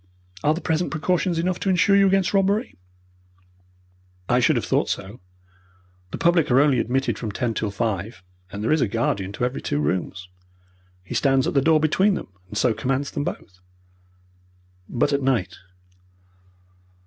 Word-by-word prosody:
Are 150 +1 +3
the 175 - -6
present 160 +1 -1
precautions 170 +2 0
enough 180 +2 -1
to 195 - -1
insure 190 +2 +3
you 200 0 +5
against 195 -1 +1
robbery?" 200 +4 +1 1.5
"I 125 - +3
should 120 - +3
have - - -1
thought - - 0
so. 100 +5 -5 0.9
The - - -5
public 170 -2 +2
are 125 +1 +5
only 140 -3 +3
admitted 135 +4 -1
from 110 -3 -4
ten 115 +3 -2
till 110 -1 -2
five, 100 -1 -3 0.3
and 100 +2 -6
there 115 - 0
is 155 -1 +3
a - - +2
guardian 100 -3 -1
to 125 - -1
every 125 +2 -3
two 70 - -2
rooms. 90 +4 -2 0.8
He 90 - -8
stands 135 -2 +2
at - - -1
the 140 - +3
door 160 +2 +4
between 185 +6 +2
them, - - -6 0.2
and 105 - -7
so 120 +1 +2
commands 135 +5 -2
them 145 - -3
both." 90 -2 -7 1.3
"But 135 +4 0
at 140 - +1
night?" 115 -9 0
135 Hz, 170 wpm, -23 LUFS, 110-170 Hz, 1.5 s, you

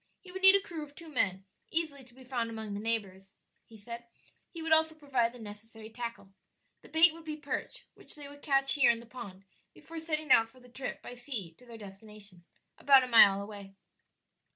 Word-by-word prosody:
He 365 - -14
would 380 +1 -7
need 385 +1 +8
a - - +5
crew 345 -5 -8
of 290 -1 -13
two 335 -1 -12
men, 195 -9 0 0.2
easily 310 -5 -2
to 240 -1 -20
be 260 - -15
found 245 -3 -3
among 220 -2 -6
his 200 - -5
neighbors, 195 -4 -2 0.3
he 225 - -15
said; 235 +3 -9 0.4
he 335 - -10
would 325 - -4
also 315 0 +4
provide 265 -6 0
the 245 - -13
necessary 220 0 -11
tackle. 230 -4 -7 0.5
The - - -16
bait 320 +1 +6
would 330 0 -13
be 310 -1 -5
perch, 290 -2 -6
which - - -7
they 290 -2 -8
would 285 0 -14
catch 275 -2 +4
here 280 -4 +4
in 235 -1 +2
the 235 - -13
pond 220 -6 -10 0.3
before 330 0 -9
setting 310 -2 -1
out 225 0 +6
for 255 - -20
the 250 0 -18
trip 255 +2 -6
by - - -8
sea 240 - -5
to 250 - -19
their 230 -1 -10
destination 200 -2 -13 0.4
about 275 -2 +6
a - - -3
mile 200 -4 +6
away. 200 -1 -11
245 Hz, 215 wpm, -31 LUFS, 215-295 Hz, 0.5 s, need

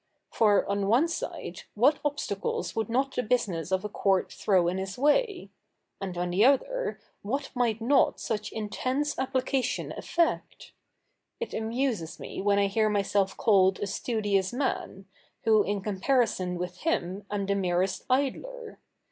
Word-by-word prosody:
For, 210 -3 +3
on 200 0 0
one 245 +10 +4
side, 335 - -5
what 270 +8 +4
obstacles 285 -9 -2
would 220 -1 -1
not 265 +3 0
the - - +1
business 205 -9 -1
of 190 +1 0
a - - 0
court 195 -2 +1
throw 185 -4 +2
in 180 +2 -1
his 190 +1 -5
way? 360 - +1 0.5
and 185 -2 -4
on 175 0 -1
the 190 +4 +3
other, 485 - +2 0.2
what 270 +7 -3
might 235 -4 +1
not 270 +4 +3
such 215 -1 -3
intense 255 +7 -2
application 260 -1 -1
effect? 340 -1 -1 0.7
It 470 - -5
amuses 225 -6 -2
me - - -6
when 200 0 +3
I 200 - +4
hear 215 +2 +2
myself 200 -1 +1
called 190 -4 +4
a - - -1
studious 200 -2 0
man, 240 -6 -3 0.4
who 220 -1 +5
in 205 0 -1
comparison 200 -2 0
with 180 0 -5
him 200 - -2
am 205 -1 -2
the 200 - +1
merest 185 -1 0
idler. 440 - -1
215 Hz, 150 wpm, -28 LUFS, 195-265 Hz, 0.7 s, who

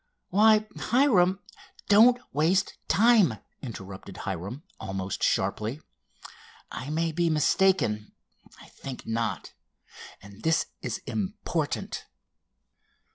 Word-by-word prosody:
"Why, 215 +2 +5
Hiram——" 200 -8 +3 0.5
"Don't 235 +4 +6
waste 165 +7 +2
time!" 215 - +5 0.3
interrupted 95 -5 -8
Hiram 100 - -5 0.2
almost 95 0 -4
sharply. 110 +7 0 0.9
"I 130 - -6
may 165 +2 0
be 170 +1 +1
mistaken—I 150 - -1
think 135 -2 -9
not, 115 0 -3 0.7
and 100 +1 -14
this 160 +4 +2 0.2
is - - -4
important." 105 -4 -3
155 Hz, 85 wpm, -27 LUFS, -, 0.9 s, Don't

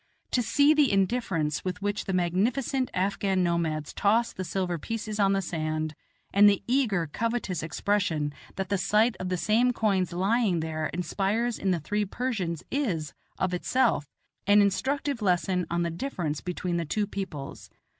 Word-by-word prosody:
To 250 - +2
see 285 +5 +4
the 300 -4 +4
indifference 190 -7 0
with 185 -1 -3
which 205 0 -1
the - - -2
magnificent 230 +9 0
Afghan 190 0 0
nomads 160 -4 -1
toss 225 +3 +2
the 185 - -4
silver 180 -1 -2
pieces 215 +4 -4
on 195 -1 +4
the 195 0 0
sand, 155 -2 -2 0.4
and 205 +1 +8
the 200 - 0
eager, 235 -9 +1
covetous 225 +1 -2
expression 160 -2 0 0.2
that 190 -1 -3
the 200 -1 +1
sight 215 +5 +3
of 185 - -3
the 180 - 0
same 225 +7 +2
coins 195 -6 +1
lying 195 +1 +1
there 155 -1 -2
inspires 200 +7 -1
in 195 - 0
the 180 -2 +2
three 210 +7 -1
Persians 195 - -3
is, 180 - -1 0.2
of 185 -1 0
itself, 215 - +1 0.4
an 205 +1 +6
instructive 265 +6 +1
lesson 180 -2 +1
on 170 0 0
the 170 - -1
difference 165 - -3
between 180 -1 -2
the 170 - -1
two 210 +7 0
peoples. 190 -9 -6
195 Hz, 165 wpm, -27 LUFS, 170-220 Hz, 0.4 s, and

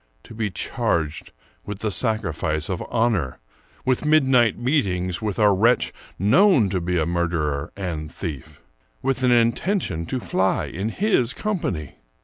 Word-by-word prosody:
To - - -12
be 110 -1 -2
charged 80 -3 -2 0.3
with 105 -1 -7
the 110 - -1
sacrifice 85 - -1
of 95 - -2
honor! 110 - 0 0.5
with 130 +1 +1
midnight 135 -7 +4
meetings 95 - 0
with 105 -3 -2
a 105 -2 +5
wretch 115 +6 +2 0.2
known 125 - +4
to 90 -1 -1
be 90 +1 -1
a 80 - +1
murderer 80 -4 -1
and 80 -5 -4
thief! 80 -8 -7 0.4
with 135 0 0
an 125 - +3
intention 115 - +1
to 130 - -2
fly 95 -5 0
in 95 +6 -3
his 135 - +1
company! 100 - -3
100 Hz, 140 wpm, -23 LUFS, 85-125 Hz, 0.5 s, a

